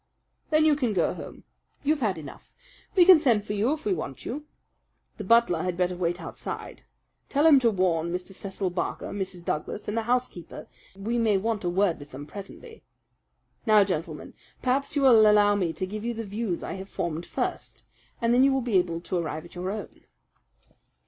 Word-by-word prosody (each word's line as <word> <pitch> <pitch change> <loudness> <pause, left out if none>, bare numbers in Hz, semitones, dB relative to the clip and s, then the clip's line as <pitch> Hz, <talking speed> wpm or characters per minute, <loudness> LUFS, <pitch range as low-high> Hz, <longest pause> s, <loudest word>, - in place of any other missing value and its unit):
"Then 310 0 +4
you 305 -2 +5
can 250 -7 0
go 175 -4 +1
home. - - -10 0.4
You've 300 +1 +2
had 210 -8 0
enough. 145 -4 -11 0.4
We 360 -2 +7
can 365 -3 +9
send 235 -9 +2
for 210 - -3
you 210 +6 +1
if 310 0 -3
we 405 - +2
want - - -6
you. 295 +1 -5 0.7
The - - -5
butler 230 -8 +4
had 180 -1 -2
better 180 0 0
wait 175 0 -1
outside. - - -7 0.5
Tell 290 +2 +2
him 300 -4 +8
to 240 -3 +3
warn 175 -5 0
Mr. 180 +2 -5
Cecil 195 -1 -4
Barker, 175 - -3
Mrs. 190 -3 -5
Douglas, 155 +7 -3
and 210 - -2
the 230 - +1
housekeeper 240 -7 -2 0.3
that 195 - -14
we 235 +3 0
may 220 -3 +3
want 215 +1 -2
a 175 - 0
word 185 -1 +1
with 145 0 -11
them 140 +1 -8
presently. 205 - -11 0.9
Now, 215 -2 +7
gentlemen, 180 -3 -4 0.3
perhaps 270 +3 0
you 285 - +2
will 225 -5 +7
allow 205 -1 +5
me 185 -5 0
to 185 - -3
give 210 +3 -6
you 235 0 -2
the 225 0 -5
views 205 -3 -3
I - - -4
have 195 - -10
formed 170 0 -3
first, - - -4 0.4
and 235 0 +2
then 250 +2 +5
you 275 - +5
will 270 0 +1
be 230 -6 +3
able 170 -2 -2
to 180 - -3
arrive 160 -2 -3
at 175 - -14
your 180 +1 -4
own." 210 +2 -7
205 Hz, 200 wpm, -26 LUFS, 180-240 Hz, 0.9 s, can